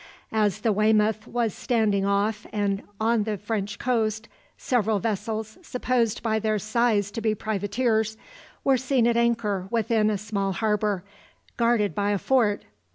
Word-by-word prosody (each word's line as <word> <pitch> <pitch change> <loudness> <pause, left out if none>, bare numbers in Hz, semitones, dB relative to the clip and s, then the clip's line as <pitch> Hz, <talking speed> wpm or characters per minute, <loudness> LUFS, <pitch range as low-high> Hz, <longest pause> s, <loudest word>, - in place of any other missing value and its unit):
As 210 -1 +1
the 225 - +2
"Weymouth" 215 +1 +2
was 235 -4 -1
standing 210 -5 +1
off 210 +2 0
and 200 -1 0 0.2
on 225 0 +2
the 210 0 -2
French 205 0 -3
coast, 220 -3 0 0.3
several 220 -5 +1
vessels, 220 +1 -3
supposed 250 - -1
by 220 -1 +1
their 215 0 0
size 215 -1 +1
to 225 - -5
be 215 -1 +1
privateers, 220 +2 0 0.5
were 270 -1 +4
seen 255 -1 +1
at 235 0 +3
anchor 230 -5 +1
within 225 -1 +2
a 210 - 0
small 200 -1 -2
harbour, 210 -1 0 0.5
guarded 230 -5 +2
by 205 +5 0
a 205 - +2
fort. 220 -2 +2
215 Hz, 150 wpm, -25 LUFS, 205-230 Hz, 0.5 s, were